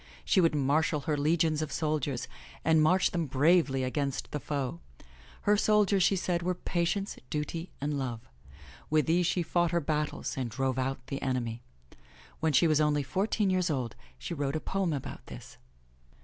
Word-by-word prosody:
She 190 Hz, -, +4 dB
would 165 Hz, -3 st, +3 dB
marshal 150 Hz, +2 st, +1 dB
her 155 Hz, +1 st, -1 dB
legions 155 Hz, +1 st, +2 dB
of 155 Hz, -, -3 dB
soldiers 150 Hz, -5 st, -1 dB, 0.4 s
and 160 Hz, 0 st, +5 dB
march 180 Hz, +5 st, +3 dB
them 170 Hz, -3 st, -1 dB
bravely 140 Hz, 0 st, +3 dB
against 140 Hz, +1 st, -2 dB
the 150 Hz, -, -2 dB
foe. 135 Hz, -, -3 dB, 0.6 s
Her 210 Hz, -, +3 dB
soldiers, 210 Hz, -2 st, +3 dB
she 195 Hz, -, +4 dB
said, 175 Hz, -2 st, -1 dB
were 180 Hz, +1 st, -1 dB
Patience, 175 Hz, +3 st, -1 dB
Duty 165 Hz, +3 st, -3 dB
and 145 Hz, 0 st, -1 dB
Love. 120 Hz, -3 st, -4 dB, 0.6 s
With 155 Hz, 0 st, +3 dB
these 170 Hz, +1 st, +2 dB
she 180 Hz, -1 st, +1 dB
fought 175 Hz, +1 st, +1 dB
her 170 Hz, -, +1 dB
battles 150 Hz, -1 st, -2 dB
and 130 Hz, -3 st, -2 dB
drove 130 Hz, +2 st, -1 dB
out 130 Hz, 0 st, -2 dB
the 140 Hz, -, -5 dB
enemy. 120 Hz, -3 st, -2 dB, 0.8 s
When 160 Hz, -1 st, +1 dB
she 145 Hz, +5 st, +4 dB
was 155 Hz, -2 st, +3 dB
only 150 Hz, -1 st, +2 dB
fourteen 195 Hz, -, 0 dB
years 185 Hz, -1 st, +1 dB
old 125 Hz, -7 st, -2 dB, 0.2 s
she 65 Hz, -, -5 dB
wrote 145 Hz, -2 st, -2 dB
a -, -, 0 dB
poem 195 Hz, +1 st, -1 dB
about 140 Hz, -4 st, -5 dB
this. -, -, -11 dB
155 Hz, 175 wpm, -30 LUFS, 135-175 Hz, 0.8 s, and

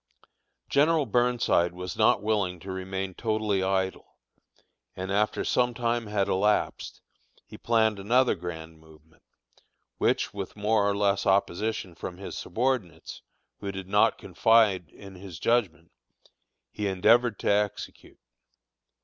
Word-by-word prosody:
General 150 Hz, +1 st, +3 dB
Burnside 120 Hz, -7 st, +1 dB
was 90 Hz, -1 st, -6 dB
not -, -, +3 dB
willing 100 Hz, -5 st, 0 dB
to 95 Hz, -, -7 dB
remain 95 Hz, 0 st, -4 dB
totally 110 Hz, -2 st, -1 dB
idle, 95 Hz, 0 st, -2 dB, 0.8 s
and, 95 Hz, +1 st, -5 dB
after 105 Hz, +1 st, 0 dB
some 125 Hz, -1 st, +1 dB
time 120 Hz, -1 st, -1 dB
had 105 Hz, -2 st, 0 dB
elapsed, 105 Hz, +3 st, 0 dB, 0.4 s
he -, -, -13 dB
planned 110 Hz, -3 st, +1 dB
another 120 Hz, +6 st, +3 dB
grand 80 Hz, -3 st, -8 dB
movement, 80 Hz, +1 st, -21 dB, 0.8 s
which, -, -, +1 dB
with 100 Hz, -2 st, -6 dB
more 105 Hz, 0 st, +1 dB
or 100 Hz, -, -1 dB
less 100 Hz, -1 st, +1 dB
opposition 95 Hz, 0 st, 0 dB
from 90 Hz, +1 st, -7 dB
his 100 Hz, -, -7 dB
subordinates, 120 Hz, -2 st, -3 dB, 0.4 s
who 100 Hz, -1 st, -4 dB
did 95 Hz, -1 st, -7 dB
not -, -, +3 dB
confide 110 Hz, -6 st, +2 dB
in 100 Hz, -1 st, -13 dB
his 95 Hz, -2 st, -10 dB
judgment, 85 Hz, -5 st, 0 dB, 0.8 s
he 105 Hz, -1 st, -3 dB
endeavored 110 Hz, +4 st, +3 dB
to -, -, 0 dB
execute. 105 Hz, 0 st, -3 dB
100 Hz, 125 wpm, -27 LUFS, 95-110 Hz, 0.8 s, General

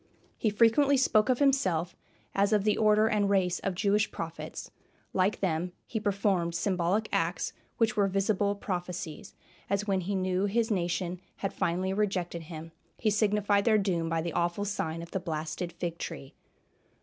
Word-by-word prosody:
He 220 Hz, -, +1 dB
frequently 240 Hz, +7 st, +4 dB
spoke 220 Hz, -3 st, +3 dB
of 255 Hz, -, +3 dB
himself 185 Hz, -, +2 dB, 0.4 s
as 200 Hz, +1 st, +2 dB
of 210 Hz, -2 st, +3 dB
the 210 Hz, 0 st, +3 dB
order 215 Hz, 0 st, +4 dB
and 210 Hz, -2 st, +2 dB
race 185 Hz, -3 st, +2 dB
of 195 Hz, -2 st, -2 dB
Jewish 205 Hz, +3 st, +2 dB
prophets; 165 Hz, 0 st, -6 dB, 0.4 s
like 190 Hz, +2 st, +1 dB
them 175 Hz, -1 st, -1 dB
he 220 Hz, -, -3 dB
performed 195 Hz, -5 st, 0 dB
symbolic 185 Hz, +4 st, +1 dB
acts -, -, 0 dB, 0.2 s
which 225 Hz, -1 st, +2 dB
were 200 Hz, -1 st, +3 dB
visible 200 Hz, +1 st, +1 dB
prophecies, 180 Hz, -5 st, -5 dB, 0.3 s
as 200 Hz, +1 st, 0 dB
when 195 Hz, -2 st, +1 dB
he 195 Hz, +3 st, -2 dB
knew 185 Hz, 0 st, +1 dB
his 225 Hz, +3 st, +1 dB
nation 175 Hz, -1 st, -1 dB, 0.2 s
had 195 Hz, -, -1 dB
finally 185 Hz, +3 st, 0 dB
rejected 190 Hz, -4 st, -1 dB
him 165 Hz, 0 st, -8 dB, 0.3 s
he 215 Hz, -, +1 dB
signified 205 Hz, -1 st, +2 dB
their 220 Hz, -2 st, +5 dB
doom 175 Hz, -5 st, 0 dB
by 165 Hz, 0 st, 0 dB
the 170 Hz, -2 st, -3 dB
awful 175 Hz, +4 st, 0 dB
sign 165 Hz, -5 st, -3 dB
of 170 Hz, -, -11 dB
the 190 Hz, -, -1 dB
blasted 160 Hz, 0 st, -4 dB
fig 170 Hz, 0 st, -4 dB
tree. 135 Hz, -, -6 dB
195 Hz, 165 wpm, -29 LUFS, 175-210 Hz, 0.4 s, their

